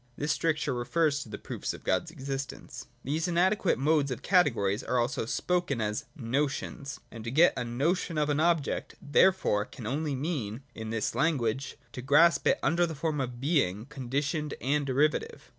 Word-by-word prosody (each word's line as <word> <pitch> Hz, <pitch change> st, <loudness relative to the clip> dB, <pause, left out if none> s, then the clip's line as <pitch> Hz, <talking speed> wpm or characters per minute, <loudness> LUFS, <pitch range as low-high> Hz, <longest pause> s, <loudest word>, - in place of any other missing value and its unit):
(This 150 Hz, +1 st, 0 dB
stricture 155 Hz, -3 st, 0 dB
refers 145 Hz, +4 st, +1 dB
to -, -, -8 dB
the 105 Hz, -, -6 dB
proofs -, -, -5 dB
of -, -, -13 dB
God's 130 Hz, -, 0 dB
existence.) 135 Hz, -3 st, -6 dB, 0.2 s
These 155 Hz, +6 st, -1 dB
inadequate 180 Hz, +2 st, +2 dB
modes 145 Hz, 0 st, +2 dB
or -, -, 0 dB
categories 115 Hz, -, +2 dB
are 125 Hz, -, 0 dB
also 120 Hz, -1 st, 0 dB
spoken 175 Hz, -3 st, 0 dB
of 105 Hz, -1 st, 0 dB
as 105 Hz, -, -4 dB
notions: 140 Hz, +1 st, -2 dB
and 115 Hz, -2 st, -8 dB
to 115 Hz, -, -4 dB
get 160 Hz, +8 st, +5 dB
a -, -, -2 dB
notion 155 Hz, +8 st, -1 dB
of 150 Hz, -1 st, +2 dB
an 145 Hz, -, +1 dB
object 165 Hz, -3 st, 0 dB
therefore 145 Hz, -, +3 dB
can 110 Hz, +2 st, -10 dB
only 145 Hz, +4 st, -1 dB
mean, 130 Hz, -5 st, -3 dB
in 110 Hz, -1 st, -6 dB
this 115 Hz, -1 st, -1 dB
language, 135 Hz, -2 st, 0 dB
to 125 Hz, -, -6 dB
grasp 145 Hz, +4 st, +4 dB
it -, -, +4 dB
under 175 Hz, +1 st, +3 dB
the 160 Hz, -, -5 dB
form 150 Hz, 0 st, -1 dB
of 125 Hz, -2 st, -4 dB
being 125 Hz, -, +1 dB
conditioned 140 Hz, +2 st, -2 dB
and 140 Hz, +2 st, 0 dB
derivative. 145 Hz, +3 st, 0 dB
140 Hz, 175 wpm, -29 LUFS, 120-160 Hz, 0.2 s, get